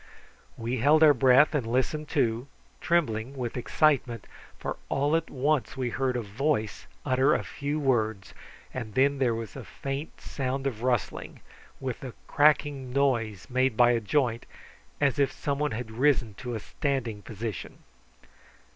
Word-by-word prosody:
We 120 +3 -2
held 150 +6 +5
our 150 -2 +8
breath 130 +3 +5
and 145 -4 +1
listened 130 +6 0
too, 115 +2 0 0.3
trembling 135 -6 0
with 120 -3 -3
excitement, 125 -3 +1 0.3
for - - -4
all 145 +3 +1
at 165 0 -1
once 140 -2 0
we 125 -2 -1
heard 130 -1 0
a 120 - -2
voice 110 +1 -2 0.2
utter 130 +1 +3
a - - -1
few 145 +2 -3
words, 110 -8 0 0.4
and 115 -5 -6
then 140 +1 +3
there 120 -4 +2
was 115 -1 -6
a 135 - -7
faint 140 +6 -6
sound 135 0 -3
of 120 -5 -2
rustling, 125 -2 -2 0.4
with 130 -3 -4
the 130 -3 -8
cracking 145 -3 +2
noise 120 -8 0
made 130 -2 +1
by 120 0 +6
a 120 - +2
joint, 115 +1 0 0.5
as 140 -2 +2
if 140 -2 +3
some 140 0 -3
one 150 0 +1
had 110 -2 -5
risen 125 -2 +2
to 120 +4 -6
a - - -3
standing 120 -3 -3
position. 110 -1 -6
130 Hz, 155 wpm, -28 LUFS, 115-140 Hz, 0.5 s, our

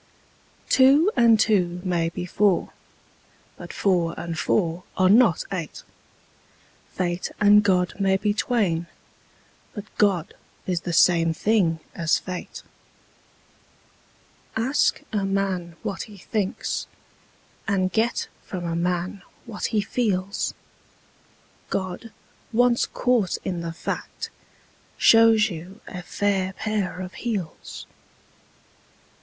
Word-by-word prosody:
Two 280 +8 +5
and 230 -3 +5
two 180 -5 +2
may 170 -3 0
be 175 +1 -5
four: 190 0 +1 0.8
but - - -9
four 175 -5 0
and 165 -1 -4
four 170 -3 0 0.2
are 185 0 +4
not 220 -6 +5
eight: 170 -6 -5 1.1
Fate 175 -1 -2
and 210 0 +7
God 185 -3 +2
may 195 -1 +3
be 205 +1 0
twain: 200 -7 0 0.9
but 205 - -5 0.2
God 190 -6 +2 0.3
is 180 -3 -1
the 175 - -4
same 165 -1 +4
thing 175 -6 +1
as 165 -2 +1
fate. 185 -1 -7 1.9
Ask 250 +6 +1
a 205 -2 0
man 195 -3 -1
what 190 - -3
he 205 - -12
thinks, 205 +3 -3 0.8
and 185 -2 +1
get 225 +2 0 0.2
from 180 -2 -6
a 165 -1 -2
man 180 +2 -2 0.2
what 225 -4 -5
he 215 -2 +1
feels: 200 -3 -1 1.1
God, 190 +4 -3 0.4
once 240 +1 +3
caught 240 -7 +1
in 180 -2 -3
the 170 0 -4
fact, 165 - -5 0.7
shows 225 -1 +6
you 180 +5 -9
a 180 - -6
fair 190 +1 -1
pair 205 -3 -2
of 185 0 -7
heels. 205 -9 -5
190 Hz, 110 wpm, -24 LUFS, 175-215 Hz, 1.9 s, and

